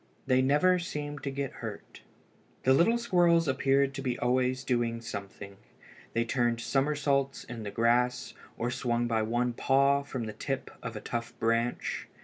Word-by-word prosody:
They 130 Hz, -1 st, +3 dB
never 150 Hz, +8 st, +4 dB
seemed 145 Hz, -4 st, -5 dB
to 140 Hz, -, -3 dB
get 135 Hz, -1 st, -3 dB
hurt. -, -, -8 dB, 0.6 s
The 130 Hz, -, +5 dB
little 175 Hz, -, +4 dB
squirrels 175 Hz, -7 st, +3 dB
appeared 135 Hz, +1 st, +2 dB
to 135 Hz, -, -5 dB
be 125 Hz, -2 st, -2 dB
always 130 Hz, +1 st, +1 dB
doing 120 Hz, -3 st, 0 dB
something. 100 Hz, -3 st, -8 dB, 0.6 s
They 115 Hz, 0 st, +1 dB
turned 120 Hz, -1 st, +1 dB
summersaults 140 Hz, +1 st, 0 dB
in 120 Hz, -2 st, -8 dB
the 105 Hz, -, -4 dB
grass, 125 Hz, +3 st, +1 dB, 0.2 s
or 120 Hz, +1 st, -1 dB
swung 120 Hz, -1 st, 0 dB
by 115 Hz, -2 st, +1 dB
one 120 Hz, +2 st, 0 dB
paw 140 Hz, +3 st, +3 dB
from 130 Hz, -3 st, -5 dB
the 110 Hz, -1 st, -5 dB
tip 135 Hz, +5 st, -4 dB
of 115 Hz, -2 st, -6 dB
a 105 Hz, -, -5 dB
tough 120 Hz, 0 st, -5 dB
branch. 115 Hz, +1 st, -1 dB
125 Hz, 160 wpm, -29 LUFS, 115-140 Hz, 0.6 s, The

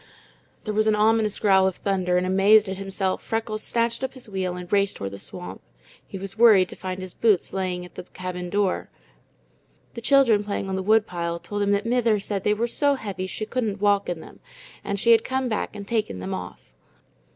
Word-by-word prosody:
There 215 Hz, -, -3 dB
was 215 Hz, +1 st, +2 dB
an 215 Hz, -, +4 dB
ominous 215 Hz, 0 st, +2 dB
growl 190 Hz, -2 st, +4 dB
of 190 Hz, -, -2 dB
thunder, 185 Hz, -2 st, 0 dB
and 180 Hz, -, +1 dB
amazed 200 Hz, +3 st, +5 dB
at 190 Hz, 0 st, -5 dB
himself, 195 Hz, -1 st, -2 dB
Freckles 225 Hz, -1 st, -3 dB
snatched 235 Hz, +3 st, 0 dB
up 265 Hz, -, -3 dB
his 260 Hz, -, -8 dB
wheel 190 Hz, -3 st, -3 dB
and 180 Hz, 0 st, -7 dB
raced 200 Hz, -1 st, +2 dB
toward 100 Hz, 0 st, -5 dB
the 100 Hz, -, -8 dB
swamp. -, -, -6 dB, 0.5 s
He -, -, -7 dB
was 195 Hz, +3 st, -3 dB
worried 205 Hz, -6 st, +6 dB
to -, -, -6 dB
find 185 Hz, 0 st, -5 dB
his 185 Hz, -1 st, -6 dB
boots 210 Hz, -7 st, +2 dB
lying 185 Hz, -2 st, -2 dB
at 180 Hz, -, -15 dB
the -, -, -8 dB
cabin 180 Hz, -1 st, -6 dB
door; 200 Hz, 0 st, 0 dB, 1.0 s
the 235 Hz, -, -7 dB
children 240 Hz, -5 st, +4 dB
playing 200 Hz, -1 st, -3 dB
on 190 Hz, -, -2 dB
the 190 Hz, -, -2 dB
woodpile 180 Hz, -5 st, +1 dB
told 205 Hz, +5 st, -5 dB
him 200 Hz, -, +1 dB
that 200 Hz, +1 st, 0 dB
"mither" 230 Hz, -3 st, +2 dB
said 200 Hz, -1 st, -3 dB
they 210 Hz, -, +2 dB
were 230 Hz, +3 st, 0 dB
so 285 Hz, +4 st, +1 dB
heavy 200 Hz, -6 st, -5 dB
she 215 Hz, -, -5 dB
couldn't 220 Hz, -3 st, -2 dB
walk 200 Hz, -1 st, +2 dB
in 170 Hz, -2 st, -4 dB
them, -, -, -14 dB, 0.4 s
and 200 Hz, 0 st, -3 dB
she 235 Hz, -, +4 dB
had 225 Hz, -1 st, +6 dB
come 260 Hz, 0 st, -1 dB
back 215 Hz, -2 st, -3 dB
and 200 Hz, -1 st, -8 dB
taken 215 Hz, -, -1 dB
them 95 Hz, +1 st, -5 dB
off. 90 Hz, -9 st, -8 dB
200 Hz, 215 wpm, -24 LUFS, 185-220 Hz, 1.0 s, worried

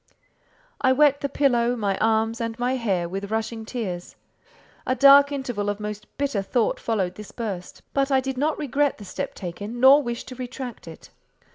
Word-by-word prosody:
I 260 Hz, -1 st, +4 dB
wet 285 Hz, 0 st, +4 dB
the 280 Hz, -, -1 dB
pillow, 245 Hz, -4 st, +2 dB
my 205 Hz, -4 st, -1 dB
arms, 225 Hz, +1 st, +1 dB
and 230 Hz, 0 st, -3 dB
my 245 Hz, +1 st, 0 dB
hair, 195 Hz, -8 st, -1 dB
with 195 Hz, +3 st, -5 dB
rushing 220 Hz, 0 st, -3 dB
tears. 195 Hz, -8 st, -5 dB, 0.7 s
A 255 Hz, -, +2 dB
dark 280 Hz, +2 st, +7 dB
interval 245 Hz, -7 st, -2 dB
of 205 Hz, 0 st, -3 dB
most 210 Hz, 0 st, -6 dB
bitter 275 Hz, -7 st, 0 dB
thought 225 Hz, +4 st, 0 dB
followed 195 Hz, -6 st, -1 dB
this 210 Hz, +1 st, -10 dB
burst; 200 Hz, -7 st, -6 dB
but 275 Hz, 0 st, +1 dB
I 270 Hz, -1 st, +4 dB
did 265 Hz, 0 st, -3 dB
not 300 Hz, +4 st, 0 dB
regret 290 Hz, 0 st, 0 dB
the 205 Hz, -, -10 dB
step -, -, -5 dB
taken, 205 Hz, +6 st, -6 dB
nor 270 Hz, +3 st, +7 dB
wish 240 Hz, -3 st, -4 dB
to 255 Hz, -, -9 dB
retract 250 Hz, -4 st, -7 dB
it. 160 Hz, -, -12 dB
235 Hz, 180 wpm, -24 LUFS, 205-265 Hz, 0.7 s, dark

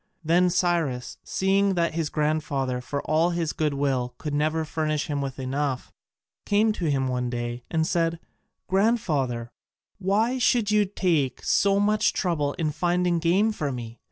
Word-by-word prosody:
Then 175 Hz, +3 st, +3 dB
Cyrus, 170 Hz, -8 st, 0 dB
seeing 195 Hz, 0 st, +1 dB
that 170 Hz, -2 st, +1 dB
his 160 Hz, -2 st, -1 dB
grandfather 145 Hz, -4 st, -1 dB
for 140 Hz, +3 st, -4 dB
all 160 Hz, +3 st, +2 dB
his 170 Hz, -3 st, -1 dB
goodwill 140 Hz, -5 st, -1 dB
could 150 Hz, -2 st, -5 dB
never 155 Hz, +2 st, 0 dB
furnish 155 Hz, -1 st, -1 dB
him 145 Hz, -3 st, -2 dB
with 135 Hz, -1 st, -4 dB
enough, 135 Hz, 0 st, -2 dB, 0.5 s
came 215 Hz, +2 st, +3 dB
to 180 Hz, -, -4 dB
him 135 Hz, -2 st, +1 dB
one 125 Hz, -1 st, -1 dB
day 120 Hz, 0 st, -4 dB
and 160 Hz, -1 st, +1 dB
said, 165 Hz, 0 st, 0 dB, 0.5 s
"Grandfather, 155 Hz, -, 0 dB, 0.5 s
why 215 Hz, +7 st, +1 dB
should 235 Hz, -4 st, +2 dB
you 210 Hz, -1 st, +4 dB
take 165 Hz, -, 0 dB
so 200 Hz, 0 st, +3 dB
much 210 Hz, +1 st, +2 dB
trouble 150 Hz, -6 st, 0 dB
in 155 Hz, -2 st, -1 dB
finding 175 Hz, +2 st, +1 dB
game 185 Hz, +6 st, +3 dB
for 150 Hz, -9 st, -3 dB
me? 120 Hz, -2 st, -7 dB
160 Hz, 155 wpm, -25 LUFS, 140-185 Hz, 0.5 s, you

